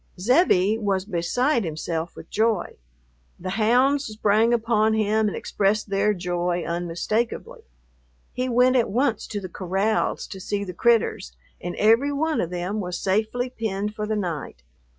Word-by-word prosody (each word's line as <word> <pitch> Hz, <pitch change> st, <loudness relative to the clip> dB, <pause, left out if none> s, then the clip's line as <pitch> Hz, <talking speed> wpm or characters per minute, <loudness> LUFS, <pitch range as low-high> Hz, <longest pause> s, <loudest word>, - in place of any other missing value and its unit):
Zebbie 220 Hz, -, +3 dB
was 195 Hz, -3 st, 0 dB
beside 225 Hz, -, 0 dB
himself 165 Hz, 0 st, -4 dB
with -, -, -12 dB
joy. 220 Hz, -4 st, 0 dB, 0.6 s
The 185 Hz, +1 st, -4 dB
hounds 250 Hz, +7 st, +3 dB
sprang 215 Hz, +1 st, +2 dB
upon 220 Hz, -2 st, +2 dB
him 215 Hz, 0 st, +2 dB
and 205 Hz, -, -3 dB
expressed 205 Hz, +1 st, 0 dB
their 200 Hz, +2 st, +2 dB
joy 175 Hz, -1 st, -1 dB
unmistakably. 215 Hz, -, -2 dB, 0.7 s
He 255 Hz, +1 st, -2 dB
went 250 Hz, +2 st, +4 dB
at 240 Hz, -4 st, +2 dB
once 235 Hz, +1 st, 0 dB
to 210 Hz, -, -4 dB
the 190 Hz, -, -6 dB
corrals 195 Hz, +4 st, -1 dB
to 190 Hz, -, -8 dB
see 200 Hz, +2 st, -2 dB
the 185 Hz, -2 st, -6 dB
"critters," 225 Hz, -, +1 dB, 0.3 s
and 175 Hz, 0 st, -4 dB
every 230 Hz, +7 st, +4 dB
one 310 Hz, +2 st, 0 dB
of 165 Hz, -, -2 dB
them 180 Hz, +4 st, -3 dB
was 180 Hz, -3 st, -3 dB
safely 220 Hz, +7 st, -1 dB
penned 210 Hz, -3 st, -3 dB
for 210 Hz, 0 st, -4 dB
the 215 Hz, -, -1 dB
night. 165 Hz, -, -4 dB
210 Hz, 150 wpm, -24 LUFS, 180-230 Hz, 0.7 s, went